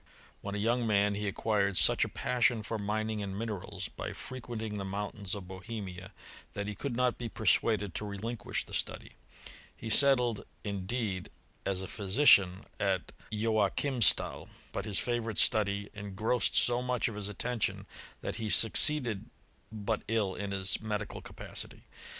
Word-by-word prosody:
When 100 0 -5
a - - -2
young 115 +3 +1
man 105 -1 +3
he 105 +1 -3
acquired 100 -1 +1
such 80 - +6
a - - -2
passion 120 -2 +1
for 110 +1 -3
mining 110 +1 -2
and 100 -1 -4
minerals, 100 -3 -4
by - - -6
frequenting 110 -4 -6
the - - -3
mountains 100 0 -4
of 95 -3 -8
Bohemia, 95 -1 -7 0.4
that 100 - -3
he 105 - -4
could 125 +4 -4
not 125 0 +1
be 120 -2 -4
persuaded 105 -1 +1
to 105 - -4
relinquish 105 +2 -4
the - - -13
study. - - -3 0.7
He 110 - -4
settled, 125 -4 +5 0.2
indeed, 100 -1 -3 0.4
as 95 -1 -1
a - - -5
phy 100 - -6
sician, 95 -4 +5
at 95 -3 0 0.2
Joachimstal; 110 +3 +2 0.2
but 100 - -4
his 105 -3 0
favourite 115 -3 -1
study 100 -1 +3
en 105 -2 -8
grossed 115 +4 +1
so 120 0 +3
much 125 0 0
of 115 - -4
his 105 -1 -4
attention, 110 0 -2 0.4
that - - -4
he 110 -2 -3
succeeded 115 - +5 0.4
but 110 0 -2
ill 105 -4 0
in 100 +1 -4
his 95 -1 +1
medical 110 -1 -4
capacity. - - -5
105 Hz, 155 wpm, -31 LUFS, 100-115 Hz, 0.7 s, such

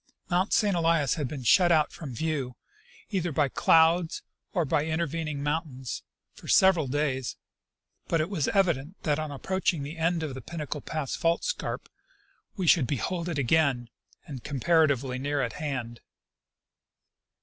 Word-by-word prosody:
Mount 180 +3 +2
St. 205 -4 +3
Elias 165 -5 +2
had 150 -5 -2
been 135 -1 -6
shut 175 - +5
out 155 -2 +3
from 140 -7 -7
view, 140 -4 -2 0.6
either 180 -4 -1
by 145 -1 +1
clouds 165 +4 +3 0.3
or 175 -4 0
by 145 +1 +1
intervening 160 -2 -2
mountains, 145 -4 -3 0.3
for - - -14
several 185 -6 +5
days; 130 -2 -1 0.7
but 165 - +1
it 155 - +1
was 175 -8 -1
evident 175 -4 0
that 150 -1 +1
on 155 -1 -3
approaching 170 +2 -1
the 150 +4 -7
end 165 0 +1
of 150 -4 -4
the 130 - -7
Pinnacle 150 +1 -5
pass 155 -4 -3
fault 165 0 +1
scarp - - -3 0.7
we 190 - -2
should 155 -5 +5
behold 170 +7 -2
it 160 - -3
again, 135 -3 +2 0.3
and 135 -5 -8
comparatively 140 -3 +1
near 145 +2 -1
at 125 -4 -1
hand. 130 -6 -4
155 Hz, 150 wpm, -27 LUFS, 135-170 Hz, 0.7 s, shut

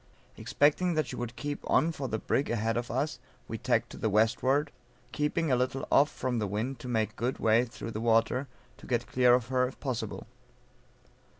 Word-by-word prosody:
Expecting 165 +4 +2
that 155 -2 +1
she 120 - -7
would 120 -1 -5
keep 145 +2 -4
on 165 - +3
for 140 -4 -4
the 110 - -2
brig 135 +5 -1
ahead 115 -1 0
of 120 0 -2
us, 140 +5 -2 0.3
we - - -5
tacked - - 0
to - - -9
the 110 - 0
westward, 130 +7 +2 0.4
keeping 150 +2 0
a - - +5
little 130 +2 -1
off 145 +2 +5
from 125 -5 -2
the 105 - -1
wind 115 +6 -3
to 125 - -8
make 110 -2 -1
good 125 +3 -2
way 115 +2 +3
through 115 -1 -7
the 110 - -4
water, 115 +4 +2 0.3
to - - -14
get 120 -2 0
clear 125 -1 +4
of 125 -1 -2
her 125 -1 +2
if 130 - -11
possible. 130 -4 -4
125 Hz, 200 wpm, -29 LUFS, 115-140 Hz, 0.4 s, a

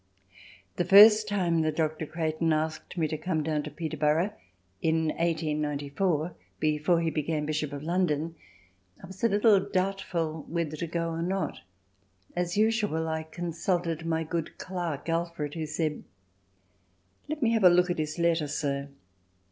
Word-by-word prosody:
The - - +2
first 210 +4 +8
time 180 -5 +1
that 155 -1 0
Dr. 155 -1 -1
Creighton 160 0 -1
asked 155 +3 -2
me 160 -2 +1
to 155 0 -4
come 160 -2 -1
down 155 -1 0
to - - -6
Peterborough 160 +3 0 0.5
in 160 0 +1
1894 155 +1 -1 0.3
before 155 +3 +2
he 165 -1 0
became 155 0 -1
Bishop 155 -1 -2
of 145 0 -6
London, 165 -2 0 0.7
I - - -6
was 190 +2 -12
a 230 - +5
little 205 0 +5
doubtful 185 -5 -2
whether 165 -2 -2
to 170 +2 -4
go 165 0 -2
or 165 0 -3
not. 190 +3 -2 0.8
As 175 +1 -1
usual, 210 -7 +1
I 160 0 -1
consulted 170 0 -2
my 165 -1 0
good 165 0 -4
clerk, 175 -6 -4
Alfred, 165 -3 -2
who 160 -2 -4
said: 155 0 -2 1.3
"Let 305 -2 -2
me 230 - +3
have 225 -3 +2
a 180 - +9
look 180 +1 +4
at 175 - -2
his 155 +1 -2
letter, 170 -2 +2
sir." 140 -1 -2
165 Hz, 155 wpm, -28 LUFS, 155-180 Hz, 1.3 s, a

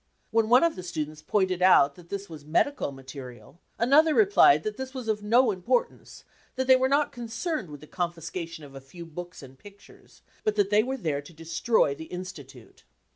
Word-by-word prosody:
When 225 -1 +2
one 250 +5 +6
of 335 -1 +2
the - - -7
students 155 -3 -5
pointed 185 +2 0
out 160 -6 +5
that 170 +2 -17
this 200 0 -5
was 155 -3 -11
medical 165 - 0
material, 135 +2 -11 0.2
another 300 +6 +4
replied 395 - +5
that 215 -1 -3
this 265 +2 -7
was 255 -3 -6
of 215 -1 -1
no 230 +3 +3
importance, 235 +6 -2 0.3
that 260 0 -1
they 260 0 +7
were 260 0 +1
not 285 +1 +2
concerned 235 - -4
with 145 -1 -10
the - - -11
confiscation 170 -1 -5
of 140 -1 -12
a 135 - -10
few 170 +6 -11
books 175 0 -9
and 135 0 -14
pictures, 205 0 -18 0.2
but 215 - 0
that 205 -1 +1
they 210 +1 +5
were 260 +4 -3
there 150 - -2
to 145 +4 -15
destroy 165 +2 0
the 160 +3 -9
Institute. 150 -10 -10
180 Hz, 195 wpm, -26 LUFS, 155-235 Hz, 0.3 s, they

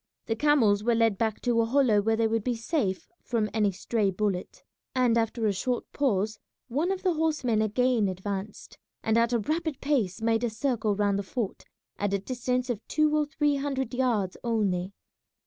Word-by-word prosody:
The 225 - -1
camels 225 -7 +3
were 235 +1 +2
led 225 -3 +2
back 220 -2 -1
to 240 -2 +2
a - - +2
hollow 235 -4 +3
where 225 +2 +1
they 225 0 +1
would 225 -1 0
be 245 0 0
safe 225 - -2
from 225 -4 -1
any 210 -2 +2
stray 200 +2 0
bullet, 190 -1 -3 0.3
and 250 -3 +3
after 225 0 0
a 205 - +2
short 245 +6 -2
pause 215 -6 0 0.3
one 300 +10 0
of 380 -1 -3
the 365 -2 +2
horsemen 300 -9 +1
again 230 0 +2
advanced 195 +2 -5 0.2
and 220 - +1
at 230 +1 +3
a 240 - +3
rapid 310 +6 -2
pace 235 -10 0
made 225 +1 +1
a 240 - +1
circle 220 -2 0
round 200 -1 +1
the - - 0
fort 205 +1 -4 0.3
at 200 -1 0
a - - +2
distance 250 +3 -2
of 235 -4 -2
two 305 0 +2
or 300 -1 +1
three 295 -1 +1
hundred 275 -2 -2
yards 235 -7 0
only. 200 -6 0
230 Hz, 190 wpm, -27 LUFS, 205-260 Hz, 0.3 s, camels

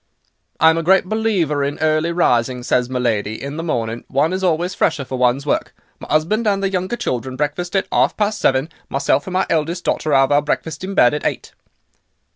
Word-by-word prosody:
"'I'm 160 +1 +5
a - - -1
great 190 +3 +3
believer 185 -9 0
in 140 +1 -2
early 155 +1 +1
rising,' 125 -7 +1
says 125 0 +1
my 130 - -2
lady; 110 -3 -1
'in 140 +2 -6
the - - -3
morning, 115 -7 -2
one 145 +6 +1
is 190 0 -3
always 175 +1 0
fresher 160 -7 0
for 130 0 -5
one's 125 +3 +2
work; 145 - -1 0.2
my - - -10
'usband 195 +9 +1
and 200 -1 +1
the 195 - 0
younger 185 +4 -1
children 130 - -3
breakfast 150 +6 -3
at 195 - +2
'arf - - +2
past 210 0 0
seven; 135 -1 +1 0.2
myself 140 +1 0
and 185 - -5
my 185 - +2
eldest 165 +3 -1
daughter 155 - -1
'ave 135 0 +4
our 145 - +4
breakfest 155 +3 -3
in 195 +1 -5
bed 120 -3 +5
at 150 - -3
eight. - - -3
155 Hz, 210 wpm, -19 LUFS, 135-180 Hz, 0.2 s, I'm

